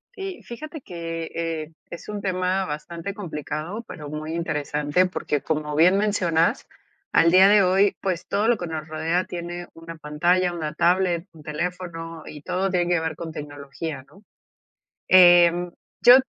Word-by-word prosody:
Sí, 390 -2 -6
fíjate 305 +5 -8
que, 165 -4 -5
eh, 165 -1 -3 0.2
es 170 - -9
un 210 -1 -4
tema 185 0 0
bastante 165 +5 -5
complicado, 175 +2 -5
pero 150 -2 -8
muy 155 +2 -5
interesante, 150 +1 0
porque 150 -5 -2
como 150 0 -2
bien 175 +5 +5
mencionas, 200 -1 +1 0.4
al 165 - +5
día 185 +2 +8
de 205 0 +6
hoy, 195 +2 +3
pues, 185 -4 -2
todo 205 +2 +1
lo 235 -1 +3
que 175 - -5
nos 160 -1 -5
rodea 165 +3 -1
tiene 175 0 -6
una 165 0 -10
pantalla, 175 +4 +1
una 155 -2 -4
tablet, 175 0 +2
un 155 - -15
teléfono, 165 0 -5
y 150 - -9
todo 185 +4 -1
tiene 175 -1 +1
que 175 -1 +3
ver 160 -1 -3
con 165 -1 -6
tecnología, 145 -1 -7
¿no? 195 +9 -20 0.9
Eh, 175 -2 +8 0.5
yo 245 +1 +10
170 Hz, 160 wpm, -24 LUFS, 155-185 Hz, 0.9 s, yo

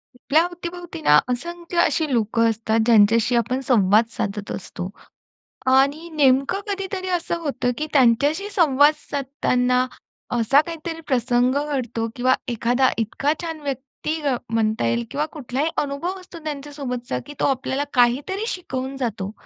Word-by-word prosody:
आपल्या 305 +6 +2
अवतीभोवती 350 -1 -7
ना 150 - +6
असंख्य 340 +7 -4
अशी 320 -2 +3
लोकं 230 0 +2
असतात 225 0 0
ज्यांच्याशी 230 +1 +4
आपण 240 +2 +1
संवाद 215 -2 +4
साधत 205 -3 -4
असतो. 180 -1 -6 0.8
आणि 280 +6 +3
नेमकं 275 +2 +3
कधीतरी 390 -1 -3
असं 340 0 -2
होतं, 285 -6 -1
की 305 - -2
त्यांच्याशी 285 - +3
संवाद 300 -6 +4
साधताना 255 -2 0 0.5
असा 245 +4 +4
काहीतरी 330 0 -6
प्रसंग 250 0 +2
घडतो 245 -6 -2
किंवा 255 +1 +3
एखादा 245 +2 +2
इतका 230 +6 0
छान 325 -2 -5
व्यक्ती 280 +3 -4
अ, 280 -4 +1
म्हणता 220 - 0
येईल 115 0 0
किंवा 295 +2 0
कुठलाही 285 +2 -2
अनुभव 295 +7 -3
असतो 365 -2 -12
त्यांच्यासोबतचा, 280 - -4
की 290 - -9
तो - - +2
आपल्याला 270 +1 -1
काहीतरी 275 - +2
शिकवून 265 - -4
जातो. 225 -6 -3
265 Hz, 135 wpm, -22 LUFS, 235-310 Hz, 0.8 s, ना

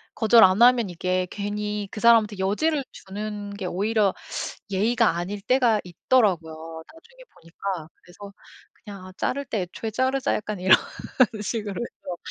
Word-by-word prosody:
거절 225 0 +6
안 185 +3 +4
하면 240 -5 +5
이게 185 +1 -1
괜히 210 0 -4
그 210 - -7
사람한테 220 -3 +4
여지를 275 +10 0
주는 205 +1 -7
게 200 -2 -7
오히려 200 +2 +1 0.6
예의가 215 -1 +2
아닐 190 +4 -4
때가 240 -3 +2
있더라고요, 165 -5 -1
나중에 475 +10 -18
보니까. 170 0 -6
그래서 200 +3 -14 0.4
'그냥 200 -4 -12
아 185 - -11
자를 280 +2 -1
때 215 -8 -2
애초에 220 +5 -6
자르자.' 260 +4 0
약간 210 -2 -4
이런 185 +1 +7 0.7
식으로 210 -2 -3
해서. 185 -6 -7
205 Hz, 315 characters per minute, -24 LUFS, 185-230 Hz, 0.7 s, 이런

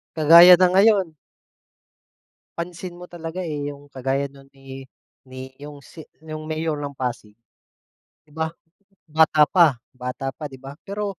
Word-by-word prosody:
Kagaya 170 +3 +8
na 185 - +6
ngayon. 195 -2 +3 1.5
Pansin 175 +1 -6
mo 180 - -9
talaga, 170 +1 -7
eh. 150 -4 -4
'Yung 145 0 -16
kagaya 135 +1 -3
nun 135 0 -18
ni 135 0 -11 0.4
ni 130 0 -10
'yung 145 0 -11
si 160 +3 -14 0.2
'yung 155 -1 -8
mayor 155 0 -3
ng 145 -1 -6
Pasig. 120 -5 -5 0.9
Di 155 - -32
ba? 160 +1 -3 0.6
Bata 155 0 +4
pa 165 -8 +4 0.2
bata 125 +1 -5
pa 150 - -8
di 135 - -14
ba, 135 +1 -11
pero 200 -2 -5
155 Hz, 145 wpm, -22 LUFS, 135-170 Hz, 1.5 s, Kagaya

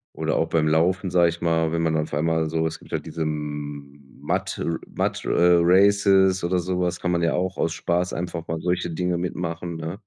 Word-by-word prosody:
oder - - -1
auch 80 - 0
beim 80 -2 +2
Laufen, 90 +4 +2
sage 85 -2 +4
ich 85 - -6
mal, 80 -1 +1
wenn 85 0 0
man 80 -1 +1
auf 75 -1 -3
einmal 80 +1 0
so 80 0 0
es 80 - -6
gibt - - -17
halt - - -3
diese 80 - -6
M 75 -2 -5 0.2
Mud - - -2
äh, - - -2 0.3
Mud - - -1
äh, 85 0 +4
Races 95 0 +4
oder 90 +1 +1
so 90 +1 -2
was. 90 0 -1
Kann 90 - -1
man 85 -1 +1
ja 85 - +2
auch 90 +1 -2
aus 85 - 0
Spaß 90 +2 -1
einfach 85 -1 -4
mal 80 0 -3
solche 90 0 -1
Dinge 90 +1 -1
mitmachen, 85 -1 -4
ne? 80 +5 -6
85 Hz, 220 wpm, -24 LUFS, 80-90 Hz, 0.3 s, sage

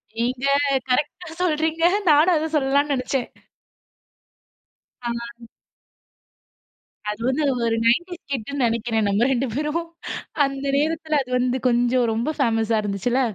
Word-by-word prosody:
நீங்க 250 +3 -1 0.4
கரெக்டா 300 +6 -1
சொல்றீங்க. 320 -1 0 0.3
நானும் 315 +4 +5
அத 315 +1 -2
சொல்லலாம்னு 280 +1 +2
நினைச்சேன். 255 0 -2 1.8
ஆ. 235 0 -5 1.6
அது 210 - -4
வந்து 265 +4 +1 0.2
ஒரு 225 - +1
நைன்டீஸ் 350 +9 +1
கிட்டுனு 270 +2 -2
நினைக்கிறேன், 225 -2 0
நம்ம 210 +5 +2
ரெண்டு 260 +1 0
பேரும். 300 +4 -1 0.6
அந்த 275 0 -4
நேரத்தில 310 0 0
அது 250 - -12
வந்து 255 +1 0
கொஞ்சம், 245 0 +2
ரொம்ப 235 +8 -1
ஃபேமஸா 225 -1 +2
இருந்துச்சுல்ல. 210 +6 0
255 Hz, 110 wpm, -23 LUFS, 235-300 Hz, 1.8 s, நானும்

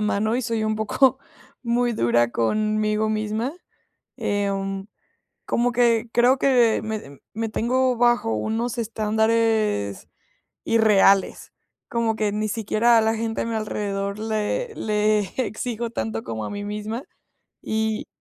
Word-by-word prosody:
mano 215 +1 0
y 255 - -1
soy 225 -2 -1
un 215 - 0
poco 220 +5 +2 0.4
muy 240 0 +1
dura 120 - +2
conmigo 215 - 0
misma. 215 +4 -1 0.7
Em, 195 -1 -2 0.6
como 240 +1 +1
que 235 -1 +2
creo 245 +3 +4
que 245 -5 +3
me, 215 -11 -6
me 225 +1 -2
tengo 250 +3 +1
bajo 240 - +2
unos 225 - -2
estándares 220 - 0 0.6
irreales, 205 -3 +3 0.4
como 230 -2 0
que 215 -2 0
ni 215 +1 -1
siquiera 225 +2 +2
a - - +3
la 220 +1 +1
gente 225 0 -2
a - - -4
mi 230 - -3
alrededor 200 -2 -3
le, 220 - -2
le 210 0 +1 0.3
exijo 235 +1 -4
tanto 110 - -3
como 110 -1 -4
a - - -5
mí 205 0 -5
misma. 210 +5 -4 0.6
Y, 220 0 -2
220 Hz, 130 wpm, -23 LUFS, 210-230 Hz, 0.7 s, creo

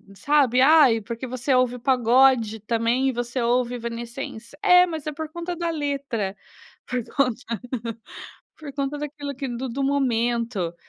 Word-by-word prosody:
sabe, 265 -1 +3
"Ai, 270 -6 +6
porque 235 +4 -6
você 255 +2 -1
ouve 255 -1 +2
o 250 - -8
pagode 245 -3 +3
também, 235 +4 +1
e - - +1
você 240 +1 -3
ouve 245 +1 +1
Evanescence". 235 +1 -7
É, 360 0 +7
mas 320 -4 -6
é 305 - -2
por 315 +1 -5
conta 345 +2 -5
da 340 0 -2
letra, 275 -10 -3 0.5
por 250 -2 -2
conta 240 -4 0 1.0
por 300 -3 -8
conta 280 +1 -2
daquilo 290 -1 -5
que 270 0 -5
do 245 +2 -4
do 270 +4 -3
momento. 235 -8 0
255 Hz, 155 wpm, -24 LUFS, 235-285 Hz, 1.0 s, É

